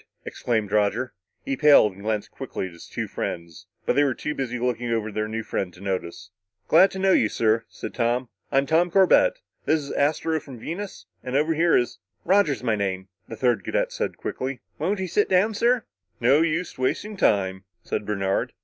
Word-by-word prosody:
exclaimed 110 -4 -2
Roger. 105 +4 +1 0.3
He 135 - -1
paled 140 -8 +6
and 95 - -14
glanced 105 0 -2
quickly - - -5
at 95 - -8
his 85 - -13
two - - -4
friends, 85 -1 -5 0.2
but - - +1
they 145 - +5
were 135 -3 +1
too 150 - -3
busy 125 -4 -3
looking 120 -1 -1
over 110 -2 -1
their 110 +1 -2
new 110 +1 -4
friend 95 -3 -3
to - - -15
notice. 95 -2 -4 0.4
"Glad 185 +5 +6
to 190 - -8
know 190 0 +3
you, 110 - +4
sir," 115 0 +1
said - - -7
Tom. 120 +1 0 0.2
"I'm 135 0 +3
Tom 165 +4 +3
Corbett. 200 - +4 0.2
This 155 - +3
is 140 -2 -7
Astro, 160 +2 +1
from 135 -4 -11
Venus. 185 - -6 0.2
And 130 +1 -4
over 155 +3 +2
here 165 +2 +4
is 120 - -1
" - - -46
"Roger's 180 -8 +3
my 115 -3 +2
name," 95 -2 -3 0.2
the 115 - -8
third 125 -2 +1
cadet - - -1
said - - -3
quickly. 130 0 -4 0.2
"Won't 200 +2 0
you 190 - -2
sit 205 +4 +1
down, 190 +4 +3
sir?" 235 +2 +2 0.3
"No 130 +6 +4
use 165 -2 -1
wasting 210 +11 -1
time," 95 - +1 0.2
said - - -3
Bernard. 95 -2 -1
130 Hz, 200 wpm, -24 LUFS, 110-165 Hz, 0.4 s, paled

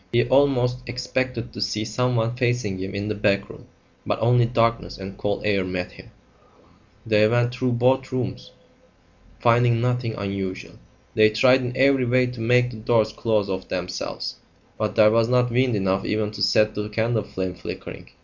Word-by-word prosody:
He 120 0 +2
almost 130 -2 +2
expected 125 -1 -3
to - - -7
see 110 0 -1
someone 120 0 0
facing 120 -6 -1
him 95 +1 -5
in 100 +1 -3
the 105 - -1
back 100 -1 0
room; - - -15 0.4
but - - -1
only 120 +1 +3
darkness 115 -1 0
and 95 0 -8
cold 100 -1 -3
air 100 -2 +1
met 90 -1 -4
him. - - -15 1.0
They 105 -1 +4
went 120 +2 +1
through 125 0 -1
both 130 +2 +1
rooms, 120 - -4 0.9
finding 120 0 +3
nothing 125 -1 -1
unusual. 100 -1 -5 0.3
They 110 0 +5
tried 125 +4 +4
in 125 0 -4
every 135 -1 +3
way 125 +1 +3
to 125 -2 -6
make 125 +2 +3
the 115 - -9
doors 110 0 +1
close 110 -3 0
of 95 -1 -4
themselves, 90 0 -4 0.4
but 110 -1 -3
there 105 -1 +6
was 115 +1 +2
not 125 -1 +2
wind 125 0 +2
enough 95 -1 0
even 105 0 -1
to 105 -1 -8
set 110 +1 +3
the 105 0 -4
candle 110 +1 0
flame 95 -2 -4
flickering. - - -9
115 Hz, 175 wpm, -23 LUFS, 105-125 Hz, 1.0 s, there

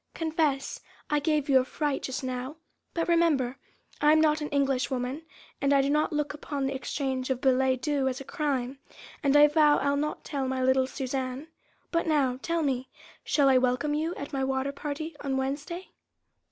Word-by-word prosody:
Confess, 315 -4 -1 0.3
I 295 - +3
gave 300 -1 0
you 270 -2 +6
a - - +1
fright 290 +1 -2
just 265 0 -4
now.... 255 +2 -4 0.4
But, 335 - 0
remember, 310 -7 +2 0.4
I 295 - +6
am 315 - +5
not 310 -1 +3
an 295 - -3
Englishwoman, 270 0 0 0.4
and 280 0 +3
I 275 -1 +4
do 280 - +1
not 300 +1 +2
look 295 -1 -1
upon 290 -2 -4
the 270 - -1
exchanging 265 -1 -2
of - - -13
billet 260 -1 +2
doux 285 -3 +1
as 260 0 -2
a - - -7
crime, 275 -4 -2 0.4
and 280 -1 +4
I 295 - +9
vow 295 -1 +4
I'll 280 0 +1
not 300 +1 -3
tell 275 -3 -2
my 260 0 -1
little 260 0 +3
Suzanne. 265 +2 -4 0.4
But 335 0 0
now, 270 -5 +2
tell 335 -1 -1
me, 260 -2 -1 0.3
shall 285 -3 +3
I 260 -1 +6
welcome 255 +4 +1
you 320 +3 -1
at 285 - -7
my 270 -1 0
water 265 +1 -1
party 295 +3 -5
on 270 -2 -2
Wednesday?" 290 +7 -4
280 Hz, 190 wpm, -28 LUFS, 265-300 Hz, 0.4 s, I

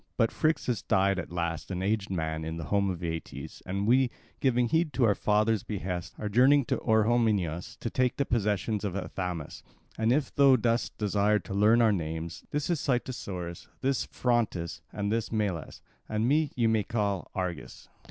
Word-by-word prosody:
But 115 -2 +3
Phrixus 155 -8 0
died 95 0 +2
at - - -6
last, 85 -2 -3
an 95 -1 -3
aged 105 0 0
man, 80 -3 -2
in 80 +1 -4
the 85 - -5
home 100 -1 +3
of 90 -2 -4
Aeetes; 80 -1 -5
and 100 +2 -1
we, 125 +3 +4 0.3
giving 125 -2 +2
heed 160 +4 +1
to 130 - +1
our 110 -3 +5
father's 105 +1 +2
behests, 90 -4 -4
are 105 - -3
journeying 130 +6 +5
to - - +2
Orehomenus 105 -7 +1
to 115 - -2
take 130 -1 +1
the 140 - +1
possessions 105 -2 0
of 100 -3 -2
Athamas. 90 -4 -4 0.4
And 110 +1 +3
if 140 +1 +1
thou 140 -2 +6
dost 115 0 0
desire 105 0 +2
to 95 - -7
learn 110 +4 +5
our 110 - +5
names, 80 -1 -4
this 150 0 -1
is 170 - +1
Cytissorus, 100 - -3
this 135 -1 0
Phrontis, 115 -9 -1
and 105 0 -2
this 115 0 -1
Melas, 100 -8 -2 0.3
and 110 +2 0
me 150 +2 +2
ye 120 - +1
may 110 -1 +3
call 100 -3 -1
Argus." 90 -4 -5
105 Hz, 180 wpm, -29 LUFS, 90-120 Hz, 0.4 s, thou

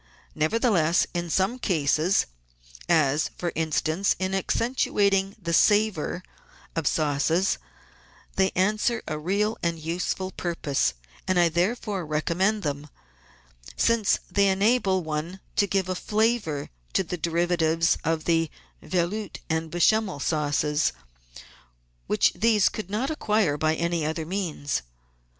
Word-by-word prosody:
Nevertheless, 170 0 +2
in 175 -1 -3
some 195 +9 +1
cases, 165 - +2 0.6
as, 150 0 +3
for 175 -1 -2
instance, 160 +4 0
in 185 0 -2
accen 210 +5 0
tuating 195 -5 +1
the 170 -3 -3
savour 205 -3 +2 0.5
of 165 -3 -1
sauces, 155 +5 +1 0.8
they 190 0 +3
answer 215 +5 +1
a 155 - -3
real 205 +7 0
and 170 -1 -1
useful 175 +3 -3
pur 175 -2 -3
pose, 140 - 0 0.3
and 185 -1 +2
I 170 -1 +5
therefore 190 +3 -1
recommend 175 +7 0
them, 145 -1 -3 0.9
since 230 -3 +3
they 200 -1 +3
enable 195 -1 +2
one 160 +4 -4 0.2
to 200 - +3
give 190 -1 0
a 185 - -1
flavour 210 -7 0 0.2
to 190 - +2
the 180 - -4
derivatives 165 -1 +1
of 160 0 0
the 165 -2 +1 0.3
Velout6 185 +2 -2 0.2
and 160 0 -1
Bechamel 185 +1 +2
sauces 150 0 0 1.1
which - - +3
these 215 +1 +3
could 215 -4 -6
not 235 +8 -1
acquire 210 - +1
by 155 +2 +1
any 170 0 -1
other 160 +1 -2
means. 165 -6 -2
175 Hz, 125 wpm, -26 LUFS, 160-200 Hz, 1.1 s, I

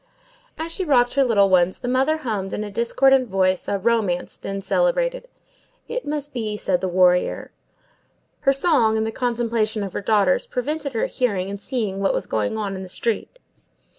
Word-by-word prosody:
As 325 +1 -4
she 375 - -1
rocked 245 -7 +3
her 275 - +3
little 210 -6 +4
ones, 185 -1 +3
the - - -6
mother 265 +5 +2
hummed 215 -10 -3
in 215 - -2
a 205 - -7
discordant 255 +3 +3
voice 185 -1 +1
a 200 - 0
romance 200 -4 0
then 195 0 -5
celebrated:— - - 0 0.6
"It - - -4
must 290 -1 -3
be, 215 -4 -3
said 185 -3 -1
a - - +1
warrior." 180 0 +2 0.9
Her 275 -2 +3
song, 270 -7 +2
and 220 - 0
the 220 - -2
contemplation 230 -3 -1
of 195 - -6
her - - -3
daughters, 200 -3 +2
prevented 285 +2 -3
her 225 - 0
hearing 200 -6 -1
and 200 0 -7
seeing 215 -7 -3
what 195 - +1
was - - -2
going 110 - -1
on 200 -2 -3
in 190 - -6
the 185 - -8
street. 230 - -3
225 Hz, 185 wpm, -22 LUFS, 195-270 Hz, 0.9 s, little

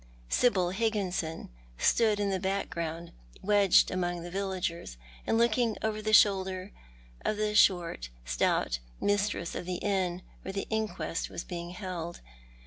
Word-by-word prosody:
Sibyl 185 -7 +3
Higginson 190 - -2 0.3
s'.ood 215 - +3
in 200 -1 +1
the 190 - 0
background, 170 -3 -3 0.3
wedged 200 -2 +5
among 175 -1 -2
the 175 - -7
villagers, 185 - -3 0.3
and 225 - +2
looking 235 0 +2
over 215 -1 -1
the 215 0 -1
shoulder 190 -2 +4 0.5
of 215 - 0
the 210 0 0
short, 175 - +3 0.2
stout - - +1 0.2
mistress 205 -4 0
of 175 - -5
the 180 - -1
inn 185 -2 -1 0.2
where 190 - -6
the 195 - -2
inquest 215 -6 -2
was - - -5
being 175 -1 -6
held. 180 -2 -5
190 Hz, 135 wpm, -30 LUFS, 175-210 Hz, 0.5 s, wedged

